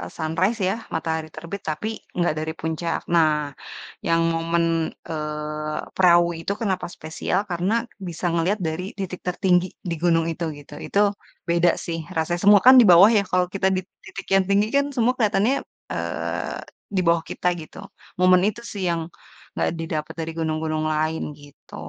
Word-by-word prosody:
e 90 - -5
sunrise 185 +8 0
ya, 195 - +1 0.2
matahari 160 -1 -2
terbit 170 +5 -7
tapi 155 +8 -3 0.3
nggak 175 -3 +2
dari 160 +1 -3
puncak. 160 +1 -2
Nah, 160 -2 +5 0.8
yang 165 0 +3
momen, 165 +1 +1 0.5
eee, 150 0 -3 0.2
Prau 175 -2 +6 0.2
itu 195 - -2
kenapa 190 -4 -1
spesial 160 +4 -2
karena 175 +4 0 0.4
bisa 175 +1 -7
ngelihat 175 +5 +1
dari 165 +4 -3
titik 185 -2 -4
tertinggi 180 0 +2 0.2
di - - 0
gunung 165 -2 +3
itu, 170 - -4
gitu. 145 0 -12
Itu 200 - +1 0.5
beda 170 0 +4 0.2
sih 165 -1 -3 0.2
rasanya. 170 +2 0
Semua 205 0 +8
kan 260 - +11
di 235 - +6
bawah 185 +6 +9
ya, - - +3
kalau 180 0 +3
kita 190 -1 +2
di - - +1 0.2
titik 195 0 -8
yang 195 - +4
tinggi 200 +1 +3
kan 280 - +3
semua 240 +1 +3
kelihatannya, 220 +2 +2 0.4
eee, - - -3 0.4
di - - +3
bawah 170 0 +4
kita 180 - -1
gitu. 155 - -11 0.4
Momen 185 0 +6
itu 235 +3 -5
sih 200 -2 -5
yang, 165 -1 -1 0.5
nggak - - 0
didapat 155 -2 -4
dari 160 - -3
gunung-gunung 155 -1 -1
lain, 155 +1 0 0.2
gitu. 145 0 -17
170 Hz, 165 wpm, -23 LUFS, 160-190 Hz, 0.8 s, kan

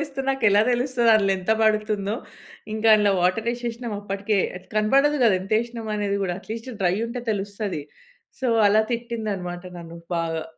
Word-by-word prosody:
యేస్తే 280 -3 -4
నాకెలా 220 -6 +4
తెలుస్తది 245 -1 +2
అందులో 200 -2 +3
ఎంత 185 +3 -3
పడుతుందో." 215 -1 +1 0.6
ఇంకా 220 +1 +1
అందులో 210 -2 +3
వాటర్ 185 +6 +1
వేశేషినాం 240 -1 -4
అప్పటికే. 200 +1 -1 0.2
అది 185 - -12
కనపడదు 275 +7 +3
గదా! 215 - +5
ఎంత 195 +3 -7
వేషినం 230 -1 -5
అనేది 200 -1 -1
గూడ. 185 - -1
అట్లీస్ట్ 225 +4 -7
డ్రై 180 -1 +3
ఉంటే 240 +1 -5
తెలుస్తది. 200 -4 -3 0.6
సో 260 - -1 0.2
అలా 215 +2 +4
తిట్టింది 230 -2 -3
అన్నమాట 175 -1 -6 0.2
నన్ను 170 0 -10 0.2
బాగా. 165 -1 -2
215 Hz, 160 wpm, -24 LUFS, 195-235 Hz, 0.6 s, గదా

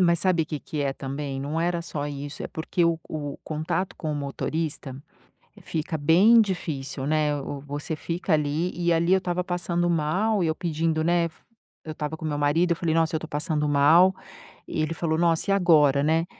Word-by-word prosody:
Mas 170 -2 +3
sabe 180 -3 +2
o - - -7
que 150 -3 -5
que 150 - -5
é 140 -1 0
também, 135 0 -5
não 150 +4 -2
era 170 0 0
só 145 -3 -4
isso, 145 0 -6
é - - -3
porque 170 +2 -1
o 170 -1 +2
co 145 -2 -6
o - - -14
contato 160 +4 -3
com 155 -2 -3
o - - -2
motorista 145 0 -3 0.7
fica 160 0 -3
bem 180 +10 +6
difícil, 140 -9 -3
né, 150 -1 +1
o 145 0 -5
o - - -12
você 145 +2 -4
fica 170 +3 -2
ali 155 +4 0
e 170 0 +2
ali 170 +3 +3
eu - - +6
estava 180 -1 -2
passando 175 -1 -1
mal 180 +6 +1
e - - +1
eu 160 - +1
pedindo 160 -2 -1
né, 170 0 +2 0.6
eu 155 - -6
estava 150 +1 -4
com 160 - -8
meu 150 -2 -1
marido 160 +5 +2
eu - - +3
falei: 165 -1 -1
"Nossa, 165 -1 +2
eu - - +3
estou 160 - -7
passando 150 0 -1
mal" 160 +6 +5 0.5
e 155 - -2
ele 155 +1 -2
falou: 160 -1 -1
"Nossa 170 +2 +1
e - - +5
agora, 150 -7 +4
né?" 160 +2 +2
160 Hz, 210 wpm, -25 LUFS, 145-170 Hz, 0.7 s, bem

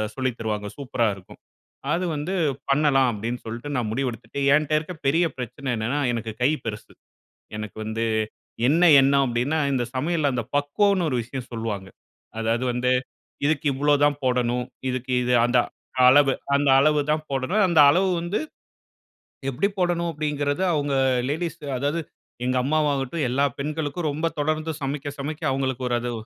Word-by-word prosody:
சொல்லி 130 -1 0
தருவாங்க. 105 -2 -3
சூப்பரா 130 -4 -1
இருக்கும். 95 -1 -15 0.5
அது 180 +2 0
வந்து 150 +6 -3 0.4
பண்ணலாம். 140 -2 +4
அப்பிடீன்னு 115 +3 -4
சொல்ட்டு 120 +6 -6
நான் 120 -4 -1
முடிவெடுத்துட்டு, 120 0 -3
என்ட்ட 155 0 +2
இருக்க 160 +4 -7
பெரிய 165 +5 +3
பிரச்சனை 125 +3 -6
என்னன்னா, 120 +6 -1
எனக்கு 115 -1 -3
கை 130 - +4 0.2
பெருசு. 105 -2 -6 0.6
எனக்கு 110 0 -7
வந்து 110 +1 -2 0.7
என்ன 160 +5 +3 0.2
எண்ணம் 140 0 +4
அப்பிடீன்னா, 125 +6 0
இந்த 125 -2 +1
சமையல்ல 150 +2 +1
அந்த 120 - -2
பக்குவம்ன்னு 180 +5 +2
ஒரு 125 - 0
விஷயம் 125 +2 -7
சொல்லுவாங்க. 105 -4 -4 0.5
அதாவது 115 +2 0
வந்து, 125 +1 +1 0.5
இதுக்கு 155 0 0
இவ்ளோதான் 145 +1 +2
போடணும், 125 -1 +1 0.2
இதுக்கு 130 0 -3
இது, 125 0 +2
அந்த 120 +1 +2 0.5
அளவு, 135 +1 +6 0.2
அந்த 145 0 +1
அளவு 150 +1 +3
தான் 155 0 -1
போடணும், 140 +11 +1
அந்த 165 -4 +5
அளவு 185 +5 +2
வந்து, 175 +5 -2 1.1
எப்படி 135 +10 0
போடணும்? 175 -1 +1
அப்பிடீங்கறது 150 +1 -1
அவுங்க 145 -2 0 0.4
லேடீஸ், 165 +1 -3 0.2
அதாவது 145 +5 -1 0.4
எங்க 130 0 +1
அம்மாவாகட்டும், 145 0 0
எல்லா 140 +3 +2
பெண்களுக்கும் 155 +2 -2
ரொம்ப 155 +3 -2
தொடர்ந்து 155 +2 -1
சமைக்க, 145 +1 -4
சமைக்க 150 +2 -5
அவுங்களுக்கு 130 -1 -2
ஒரு 120 - +1
அது 120 0 -3
140 Hz, 145 wpm, -24 LUFS, 125-155 Hz, 1.1 s, அளவு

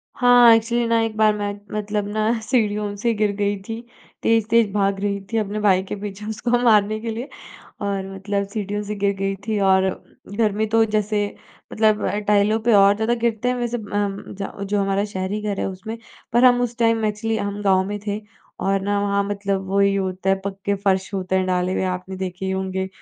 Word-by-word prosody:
हाँ। 245 -2 +7
एक्चुअली 235 +1 0
ना 230 0 +3
एक 225 -1 -2
बार 215 -1 +4
मैं 205 -1 -2 0.2
मतलब 210 -1 -2
ना 215 +2 +1
सीढ़ियों 210 -4 0
से 230 +3 0
गिर 210 -1 +1
गई 205 0 0
थी 225 +1 -5 0.4
तेज़-तेज़ 225 -1 +3
भाग 200 -1 +1
रही 200 0 -1
थी 225 - 0
अपने 210 0 -1
भाई 190 -3 +3
के 190 - -5
पीछे 205 0 -7
उसको 235 +3 0
मारने 215 -2 +4
के 230 +1 -5
लिए 235 +4 -5 0.5
और 195 -1 -3
मतलब 200 +1 -2
सीढ़ियों 205 0 -3
से 210 0 -4
गिर 200 0 +1
गई 195 0 -1
थी 215 -1 0
और 190 0 +4 0.5
घर 215 -2 +2
में 220 - +1
तो 225 0 +4
जैसे 210 -1 0 0.5
मतलब 215 -1 +2 0.2
टाइलों 210 +1 +3
पे 230 0 +3
और 200 0 +6
ज़्यादा 220 +2 +1
गिरते 235 0 -1
हैं। 250 - 0
वैसे 240 0 -2
अम 205 -2 -3 0.2
ज 195 - -3 0.2
जो 205 -1 +2
हमारा 195 0 +1
शहरी 205 0 -3
घर 205 -2 -2
है - - -1
उसमें 195 +4 -7 0.4
पर 240 +2 +4
हम 245 -1 +6
उस 240 -1 -2
टाइम 230 -1 +2
एक्चुअली 215 +2 -1
हम 205 -1 -3
गाँव 190 -1 +3
में 205 +1 -3
थे 205 +1 -2 0.4
और 195 0 +1
ना 205 +1 0
वहाँ 200 0 +1
मतलब 200 -1 -2
वही 200 0 +3
होता 190 -1 -2
है 195 0 +1
पक्के 200 0 -2
फ़र्श 190 0 +1
होते 190 -1 -1
हैं 185 0 +1
डाले 180 0 0
हुए 190 - 0
आपने 185 +1 -9
देखे 185 0 -5
ही 190 - -1
होंगे 190 0 -2
205 Hz, 205 wpm, -22 LUFS, 195-220 Hz, 0.5 s, हाँ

